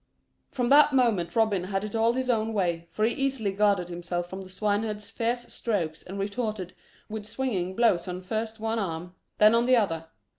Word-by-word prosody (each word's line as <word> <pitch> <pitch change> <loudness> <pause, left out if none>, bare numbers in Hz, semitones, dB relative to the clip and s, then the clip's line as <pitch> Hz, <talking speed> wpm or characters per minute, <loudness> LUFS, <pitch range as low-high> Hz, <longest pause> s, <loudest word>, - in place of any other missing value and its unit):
From 245 -3 -1
that 295 0 +7
moment 220 -10 +2
Robin 215 -5 +2
had 195 +1 -2
it 210 - -5
all 225 +1 +3
his 260 0 -2
own 225 -2 +1
way, 170 -4 -1
for 215 +6 0
he 230 - +1
easily 270 -7 0
guarded 200 -3 +2
himself 175 0 -3
from 190 +2 -7
the 190 - -10
swineherd's 210 +2 -2
fierce 240 +2 -1
strokes 170 -9 -2
and 190 +2 -8
retorted 200 -2 -3 0.3
with 215 -1 -6
swinging 205 -7 -2
blows 210 -7 +3
on 180 0 -4
first 220 +3 -3
one 225 +1 -1
arm, 175 -2 -4 0.2
then 215 +1 +6
on 235 +1 +3
the 255 - +6
other. 165 -8 0
210 Hz, 190 wpm, -27 LUFS, 185-230 Hz, 0.3 s, that